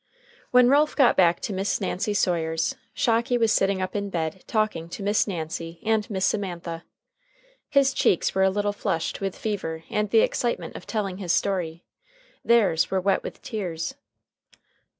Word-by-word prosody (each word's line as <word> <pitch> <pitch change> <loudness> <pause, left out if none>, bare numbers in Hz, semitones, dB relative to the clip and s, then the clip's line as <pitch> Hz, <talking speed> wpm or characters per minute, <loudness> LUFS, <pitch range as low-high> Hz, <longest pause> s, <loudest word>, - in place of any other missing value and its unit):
When 250 0 +6
Ralph 290 +3 +3
got 270 -4 +5
back 175 -2 +4
to 210 - -3
Miss 195 +1 -1
Nancy 205 +1 -2
Sawyer's, 165 -4 0 0.2
Shocky 235 +2 +1
was 225 -2 +2
sitting 195 -2 +2
up 185 - -5
in 200 0 -2
bed 170 0 -3
talking 215 -7 -1
to 200 - -7
Miss 205 +2 +2
Nancy 165 -2 -5
and 220 -1 +1
Miss 190 -3 0
Semantha. 175 -5 -3 0.9
His 275 -1 +3
cheeks 175 - +2
were 190 - +1
a 190 - +5
little 205 +1 -1
flushed 165 -4 -2
with 195 -1 -3
fever 165 -7 -3
and 210 0 0
the 225 +1 +5
excitement 240 -1 -1
of - - -9
telling 200 -5 -2
his 180 -4 -1
story; 175 -4 -1 0.6
theirs 215 -9 +3
were 190 - +1
wet 195 +1 +1
with - - -9
tears. 185 0 -4
195 Hz, 165 wpm, -25 LUFS, 170-215 Hz, 0.9 s, When